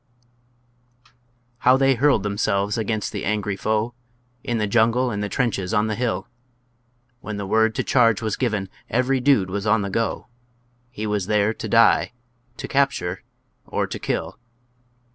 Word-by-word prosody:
How 130 +1 +5
they 135 0 +4
hurled 130 -4 +2
themselves 100 0 0
against 110 -2 -2
the - - -5
angry 105 -1 -1
foe, 110 +4 -1 0.5
In 120 - -1
the 105 - 0
jungle 115 +4 +2
and 105 - -3
the 105 - -3
trenches 110 -6 -1
on 105 0 +3
the 110 - -1
hill! 120 +1 -2 0.9
When 110 -4 -6
the 100 - -4
word 110 +2 +2
to - - -1
charge 115 -5 +3
was 110 -2 -2
given, 110 -6 -1 0.2
every 130 +2 +1
dude 125 -8 +2
was 100 +2 -3
on 105 0 +3
the 100 - -4
go 115 +2 -1 0.6
He 110 -3 -6
was 105 -3 -1
there 105 +1 +2
to 110 - -6
die, 115 +2 +4 0.4
to - - -6
capture, 130 -10 0 0.4
or - - -2
to - - -6
kill! - - -3
110 Hz, 160 wpm, -22 LUFS, 105-120 Hz, 0.9 s, How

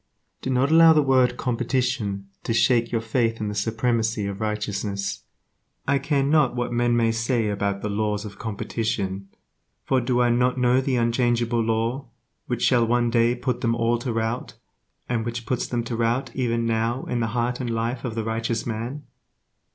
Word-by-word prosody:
Do - - -4
not 130 +3 +2
allow 165 0 +8
the 150 -1 +4
word 130 -2 +3
"competition" 120 -5 -1 0.2
to 115 - -2
shake 115 +1 +3
your 115 -2 0
faith 115 0 0
in 105 - -2
the - - -4
supremacy 115 +1 0
of 100 +1 -5
righteousness. 100 - -3 0.6
I 140 0 +3
care 140 0 +1
not 145 -2 +3
what 120 0 -2
men 120 0 +2
may 115 -1 +3
say 115 -1 0
about 100 -1 -1
the - - -1
"laws 105 0 -1
of 100 -2 -9
competition," 100 -3 -3 0.6
for 130 -1 +2
do 120 0 0
I 120 -1 +3
not 125 +2 +2
know 125 +1 +3
the 130 -1 0
unchangeable 120 0 +1
Law, 115 +4 -1 0.4
which 120 -2 -2
shall 120 -3 +4
one 120 0 +2
day 120 0 +3
put 125 0 -2
them 115 -2 +1
all 115 0 +1
to 120 +1 -3
rout, 115 +2 -2 0.5
and 115 -2 -1
which 120 0 -4
puts 125 +1 -1
them 120 -1 -2
to 115 0 -4
rout 120 +2 -1
even 115 -2 0
now 115 +2 0
in 125 - -2
the 115 - 0
heart 120 +1 0
and 125 -2 -3
life 115 +2 -2
of 115 -3 -4
the 115 - -2
righteous 115 +1 -2
man? 120 +6 -4
115 Hz, 185 wpm, -24 LUFS, 110-125 Hz, 0.6 s, allow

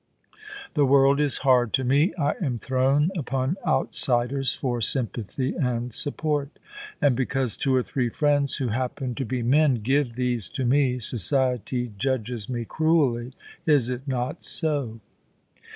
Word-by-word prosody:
The 150 - +2
world 140 +1 +4
is 145 -2 +1
hard 125 -4 +4
to 135 - +2
me. 140 +8 +3
I 145 -3 +1
am 130 -8 -1
thrown 135 +7 +1
upon 135 +1 -1
outsiders 130 0 +1
for 120 -3 -2
sympathyand 120 - -2
support. 145 +1 -2 0.4
And 140 -4 +3
because 130 -1 -1
two 135 -2 +1
or 130 - +2
three 125 -2 -1
friends 145 0 +1
who 130 -3 -2
happen 130 +2 -3
to 135 - -3
be 125 +1 -2
men 140 +3 +4
give 130 -1 +1
these 125 -4 -1
to 130 - -1
me, 130 0 +2
society 125 +1 0
judges 125 -3 -2
me 120 -2 -3
cruelly. 140 -6 +1 0.3
Is 140 -6 +3
it 125 +3 -6
not 125 -2 -3
so 140 -9 -1
130 Hz, 140 wpm, -25 LUFS, 120-140 Hz, 0.4 s, world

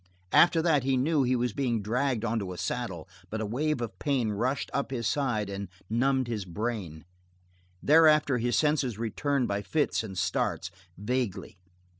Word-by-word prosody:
After 165 -1 +5
that 160 -5 +3
he 135 0 +1
knew 150 +3 +2
he 130 -1 +2
was 120 -2 -1
being 120 -5 -1
dragged 125 +1 0
onto 105 -5 -2
a - - -9
saddle, 95 -9 -3 0.2
but 110 - -4
a 110 - -2
wave 140 +5 -1
of 115 -2 -5
pain 130 -7 0
rushed 125 +7 -1
up 140 - -1
his 120 -3 -3
side 120 -6 0
and 100 0 -5 0.2
numbed 130 +2 +2
his 110 -4 -3
brain. 95 -4 -4 0.8
Thereafter 150 -4 +5
his 120 +1 +1
senses 145 -7 +1
returned 125 +4 -1
by 100 0 -1
fits 150 +8 0
and 100 -4 -7
starts, 85 - -1 0.3
vaguely. 105 -4 -3
120 Hz, 165 wpm, -28 LUFS, 105-140 Hz, 0.8 s, After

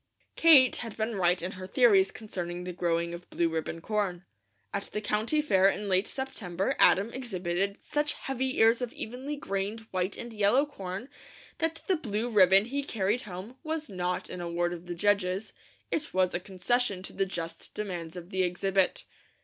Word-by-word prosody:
Kate 285 -7 +7
had 230 -3 -5
been 220 +1 -1
right 180 -2 +2
in 180 - -2
her 185 -1 -8
theories 195 -4 +5
concerning 180 -5 -5
the 180 0 -5
growing 170 -1 0
of 170 +1 -9
blue 170 - +1
ribbon 160 0 -3
corn. 195 -3 -2 0.5
At 200 - -2
the - - -2
County 220 +8 0
Fair 195 -9 +5
in 205 +1 -2
late 190 +1 +2
September 200 -9 -2
Adam 200 +5 +5
exhibited 195 -5 -2
such 295 0 0
heavy 265 0 -3
ears 225 +2 +5
of 245 -2 -2
evenly 255 +6 -5
grained 200 -3 -3
white 185 +1 -1
and 235 -1 -5
yellow 215 +7 +3
corn 195 -4 -6 0.5
that 325 0 -1
the 375 - +2
blue 225 -4 -2
ribbon 195 -1 +6
he 280 +4 -2
carried 220 -3 0
home 190 +8 -8
was 315 -3 -4
not 180 -1 -2
an 180 - -6
award 175 0 -1
of 175 0 -9
the 175 - -4
judges; 200 +1 +1 0.4
it 305 - -2
was 185 -1 +3
a 175 - 0
concession 195 +2 0
to - - -7
the 195 - 0
just 170 -3 -6
demands 180 -5 -4
of 175 +1 -9
the 190 - +1
exhibit. 185 +1 +1
195 Hz, 180 wpm, -29 LUFS, 180-235 Hz, 0.5 s, Kate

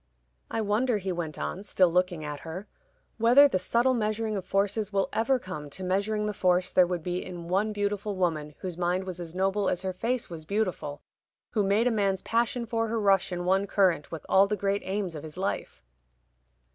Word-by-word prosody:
"I 225 - -1
wonder," 215 +3 +1
he 190 -1 -3
went 170 -3 -4
on, 190 - -4
still 185 -3 +2
looking 180 -3 +1
at 150 -1 -5
her, 175 +7 -7 0.5
"whether 245 +6 +7
the 220 -9 0
subtle 235 +7 +2
measuring 215 -1 -1
of 195 - -3
forces 205 +2 0
will 195 -1 +1
ever 235 +4 +2
come 180 -10 -7
to 190 +6 -8
measuring 205 +3 0
the 210 - -1
force 185 -1 +2
there 180 -1 +5
would 175 -2 -3
be 180 +1 -2
in 175 -2 -8
one 195 +5 +1
beautiful 205 0 -2
woman 155 -5 -1
whose 180 -2 -5
mind 180 +2 +1
was 185 -2 -6
as 170 -1 -7
noble 195 +1 +1
as 180 - -1
her 190 -1 -2
face 235 +6 -1
was 165 -2 -8
beautiful 175 -6 -2 0.5
who 215 - +1
made 200 +4 +2
a 250 - +3
man's 195 -3 0
passion 235 +1 0
for 225 0 -1
her 225 +1 -1
rush 195 -2 +3
in 175 0 -3
one 190 +2 +2
current 185 -8 +2
with 165 -3 -7
all 195 +1 +5
the 210 +1 -1
great 200 0 0
aims 190 -2 -2
of 150 - -6
his 155 +2 -10
life." 185 - -3
195 Hz, 210 wpm, -28 LUFS, 180-210 Hz, 0.5 s, whether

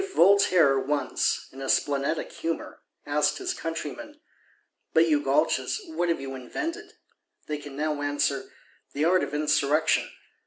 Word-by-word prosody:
If 390 0 -8
Voltaire 180 -7 +5
once, 145 +2 -1
in 135 - -12
splenetic 140 +2 0
humour, 165 0 -4 0.3
asked - - +1
his 370 -1 -2
countrymen: 295 - -6 0.8
'But - - +6
you, 300 -2 +3
Gualches, 305 - +1 0.2
what 175 - 0
have 170 - +1
you 135 0 -6
invented?' 325 - -5 0.5
they 150 -1 -4
can 145 -2 -10
now 150 0 -1
answer: 145 -1 -1 0.4
The 145 +2 0
Art 185 +2 +3
of 145 - -4
Insurrection. 150 +1 +2
155 Hz, 140 wpm, -26 LUFS, 145-185 Hz, 0.8 s, But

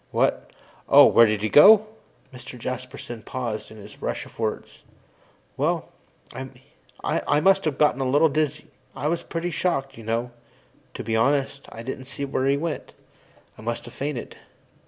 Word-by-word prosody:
What? - - 0 0.4
Oh. - - +9
Where 115 -1 +6
did 105 -1 -1
he 110 - +1
go?" 210 - +8 0.5
Mr. 125 0 -9
Jasperson 125 -1 -6
paused 110 -5 -4
in 110 - -13
his 105 0 -13
rush - - -3
of - - -17
words. 110 -2 -4 0.8
"Well, - - 0 0.4
I 130 +2 -4
must 195 +3 +3
have 150 -3 -1
gotten 150 -3 +3
a 130 - 0
little 145 +5 +5
dizzy 155 0 -1 0.3
I 150 - -2
was 165 +2 0
pretty 170 +1 -4
shocked, 135 -8 -1
you - - -10
know. 115 +2 -2 0.6
To - - -5
be 110 0 -1
honest, 140 +3 +1
I 115 - -8
didn't 130 +1 -6
see 140 +1 -5
where 135 -1 -1
he 140 +1 +3
went. 165 +1 -5 0.6
I - - -9
must 120 +1 -4
have 120 - -11
fainted. 140 -3 -5
130 Hz, 165 wpm, -24 LUFS, 115-150 Hz, 0.8 s, Oh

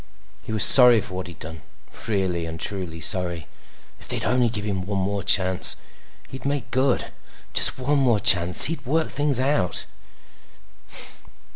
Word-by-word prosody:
He - - -10
was 110 -2 +1
sorry 125 -3 +7
for 95 - -7
what 90 0 -7
he 90 - -11
had - - -25
done—really 85 +2 -7
and 80 0 -9
truly 85 -3 -6
sorry. 90 -5 -2 0.5
If - - -10
they'd - - -3
only 125 +1 0
give 105 -2 -6
him 95 -3 -4
one 100 -1 -4
more 100 +1 -4
chance, 95 -1 +3 0.5
he'd 130 - -11
make 140 -3 -5
good. 130 0 -2 0.4
Just - - +3
one 140 +3 -2
more 120 -5 0
chance. 90 -2 +6
He'd 160 -2 -4
work 155 +5 -3
things 145 -3 0
out. 130 - -2
105 Hz, 155 wpm, -21 LUFS, 90-130 Hz, 0.5 s, sorry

